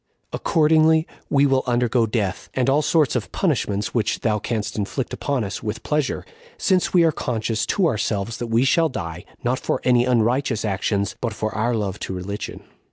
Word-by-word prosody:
Accordingly 160 0 +3 0.2
we 140 0 +4
will 135 -1 +3
undergo 120 -1 +2
death, 105 -4 -2
and 130 0 +2
all 145 +2 +3
sorts 155 -3 +2
of 120 - -2
punishments 105 - -1
which 110 -3 0
thou 105 -2 +1
canst 110 0 -3
inflict 110 +5 -3
upon 140 -5 -1
us, 100 0 -5
with 110 +1 -4
pleasure, 150 -2 -1 0.3
since 185 -3 +2
we 175 -2 +5
are 165 - +4
conscious 115 -5 -2
to 195 - +2
ourselves 105 -4 -1
that 120 - -4
we 115 +3 +2
shall 165 +4 +3
die, 85 - -6 0.2
not 125 +2 0
for - - -1
any 125 -1 +4
unrighteous 120 -1 +1
actions, 100 0 -1
but 115 -3 -1
for 110 +1 -3
our 115 +3 0
love 105 -2 -2
to - - -4
religion." 100 +3 -6
120 Hz, 180 wpm, -22 LUFS, 105-140 Hz, 0.3 s, we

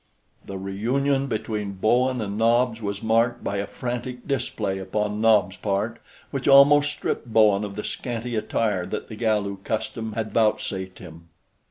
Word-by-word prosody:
The 100 - -5
reunion 130 +9 0
between 105 -4 -3
Bowen 125 +6 +2
and 100 -1 -3
Nobs 115 +1 +2
was 100 0 -4
marked 115 +2 +2
by 100 - -2
a 100 0 -2
frantic 125 +1 -5
display 110 -7 -2
upon 105 +2 -2
Nobs' 105 -4 +3
part, 105 +3 -2 0.3
which 135 -2 -3
almost 145 +1 +7
stripped - - -3
Bowen 105 -2 +4
of 100 -1 -5
the 105 - -4
scanty 120 -1 -4
attire 105 -3 -1
that - - -5
the 110 - -7
Galu 105 -3 0
custom 110 +2 -4
had 110 -1 -4
vouchsafed 105 -4 0
him. 85 +1 -12
110 Hz, 155 wpm, -24 LUFS, 100-120 Hz, 0.3 s, almost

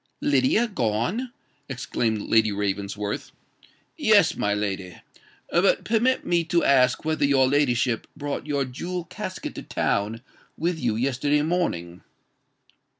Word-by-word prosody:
"Lydia 145 - +2
gone!" 180 - -1 0.4
exclaimed 120 -4 -2
Lady 110 -1 +3
Ravensworth. 100 +1 -3 0.7
"Yes—my 105 - +3
lady. 95 -4 -3 0.5
But 175 +3 +3
permit 235 +4 +1
me 170 -1 +2
to 170 +1 +1
ask 130 +1 +3
whether 155 -1 0
your 135 -2 +4
ladyship 130 -4 +1
brought 145 0 -4
your 140 -2 0
jewel 175 +8 -5
casket 185 +2 -6
to - - -7
town 110 +4 -1 0.3
with 170 0 -1
you 120 -6 0
yesterday 140 +4 +1
morning." 90 - -2
135 Hz, 115 wpm, -25 LUFS, 110-170 Hz, 0.7 s, your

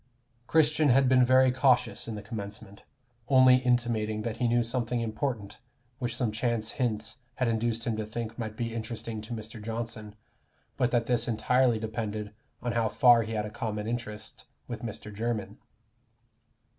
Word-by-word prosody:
Christian 155 -1 +3
had 135 +1 +5
been 130 0 +5
very 130 +1 +5
cautious 130 -2 +2
in 115 - -4
the 105 - -7
commencement, 100 -1 -7 0.5
only 130 -2 +7
intimating 120 -4 0
that 115 0 -3
he 120 - +1
knew 120 +1 +3
something 120 0 -1
important 110 -2 -3 0.4
which 120 -3 -2
some 120 -3 0
chance 110 0 -1
hints 110 -2 -2 0.2
had 125 - 0
induced 115 0 0
him 115 - 0
to 110 - -2
think 115 0 -5
might 110 -1 -4
be 115 -1 -2
interesting 115 -1 -5
to 110 +3 -10
Mr. 110 0 -8
Johnson, 110 -1 -5 0.6
but 125 - +2
that 120 -2 +1
this 120 -1 +1
entirely 120 +2 +2
depended 110 -1 -4 0.3
on 120 - 0
how 115 -1 +1
far 120 +1 +6
he 110 0 -4
had 105 -1 -1
a 105 - -6
common 105 -1 -3
interest 110 -2 -5 0.2
with 120 -2 -6
Mr. 110 -2 -6
Jermyn. 110 0 -3
115 Hz, 165 wpm, -29 LUFS, 110-125 Hz, 0.6 s, only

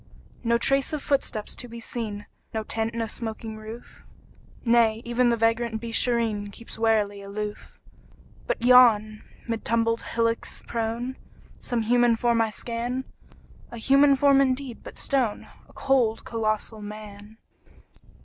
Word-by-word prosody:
No 235 0 +3
trace 275 +4 +2
of 300 - -3
footsteps 250 -6 -1
to 245 - -8
be 235 0 -9
seen, 215 -3 -4 0.3
No 220 - -1
tent, 225 +1 -2
no 230 -1 -1
smoking 220 0 -4
roof; 220 +2 -11 0.6
Nay, 230 -1 +3
even 240 +1 +2
the 235 - +2
vagrant 230 0 +1
Beeshareen 230 -2 0
Keeps 230 +1 -9
warily 210 -3 +1
aloof. 205 +1 -7 0.7
But - - -2
yon, 225 -4 +6 0.3
mid 230 -1 -3
tumbled 230 0 +1
hillocks 230 0 -1
prone, 235 +3 -3 0.4
Some 235 -2 -1
human 240 +1 +4
form 235 0 +2
I 225 - +1
scan 240 +4 -4 0.7
A 235 - -9
human 275 +4 +5
form, 275 0 +5
indeed, 260 -2 -1
but - - -11
stone: 250 -6 0 0.2
A - - -19
cold, 250 -5 +1
colossal 215 -1 -2
Man! 210 0 -10
230 Hz, 135 wpm, -25 LUFS, 220-245 Hz, 0.7 s, yon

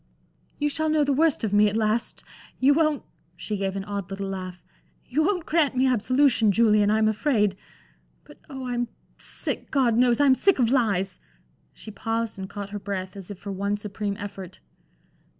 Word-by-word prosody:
"You 295 - 0
shall 315 +2 -1
know 305 -1 +3
the 285 -1 +1
worst 310 -1 +2
of 210 -2 -1
me, 210 0 +5
at 210 - -2
last. 220 +1 -1 0.3
You 270 +3 +4
won't" 310 -1 +1 0.3
she 215 - -4
gave 195 -1 -2
an 195 - -3
odd 200 -2 -5
little 195 0 -4
laugh 185 -2 -6 0.4
"you 290 +5 0
won't 360 0 0
grant 305 -5 +1
me 260 - +3
absolution, 255 -2 +3
Julian, 210 -1 +4
I'm 215 +1 +3
afraid. 215 -3 +1 0.7
But - - -17
oh, 265 -2 -6
I'm 240 -1 -1 0.3
sick - - -3
God 255 -5 +2
knows, 245 0 +3
I'm 280 -2 +6
sick 390 +9 +3
of 240 -3 +2
lies!" 195 -8 +1 0.5
She 215 - -11
paused 225 +1 -3
and 190 0 -6
caught 200 -1 -7
her 205 - -4
breath 190 -1 -5
as 195 -1 -10
if 205 - -7
for 200 +2 -7
one 200 +2 -1
supreme 205 0 -4
effort. 195 -3 -8
215 Hz, 185 wpm, -25 LUFS, 200-265 Hz, 0.7 s, I'm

